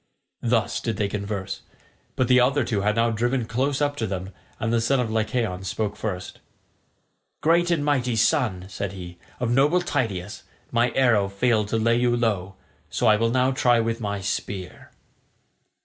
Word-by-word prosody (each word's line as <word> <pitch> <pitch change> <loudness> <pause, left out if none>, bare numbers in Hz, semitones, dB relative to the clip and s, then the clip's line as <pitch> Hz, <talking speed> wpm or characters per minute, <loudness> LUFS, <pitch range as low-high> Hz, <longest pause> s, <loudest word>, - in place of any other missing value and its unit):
Thus 115 -1 +1
did 115 - -2
they 105 -2 +1
converse, 100 -1 -4 0.5
but 130 - +1
the 125 0 +5
other 135 +3 +3
two 105 -3 -1
had 105 +1 +1
now 115 0 +2
driven 120 +2 0
close 135 +5 0
up 145 0 0
to 110 - -1
them, 95 0 -4 0.3
and 115 +1 -1
the 115 - +2
son 135 +4 +2
of 120 -3 -1
Lycaon 110 -4 -1
spoke 105 +2 -2
first. 95 -4 -5 1.0
"Great 170 +2 +3
and 160 -4 +1
mighty 130 -5 +1
son," 110 - +1
said 100 0 -4
he, 90 -2 -9 0.2
"of 120 -2 -1
noble 145 +8 +4
Tydeus, 105 - -2 0.3
my 120 +1 +3
arrow 110 -7 +3
failed 105 +1 +1
to 115 - 0
lay 115 +1 +2
you 120 0 +2
low, 100 -5 -1 0.3
so - - -1
I 110 - +6
will 115 +2 +1
now 130 +2 +2
try 125 -2 +3
with 115 +1 -1
my 100 -2 -3
spear." 95 -1 -4
115 Hz, 175 wpm, -24 LUFS, 100-125 Hz, 1.0 s, I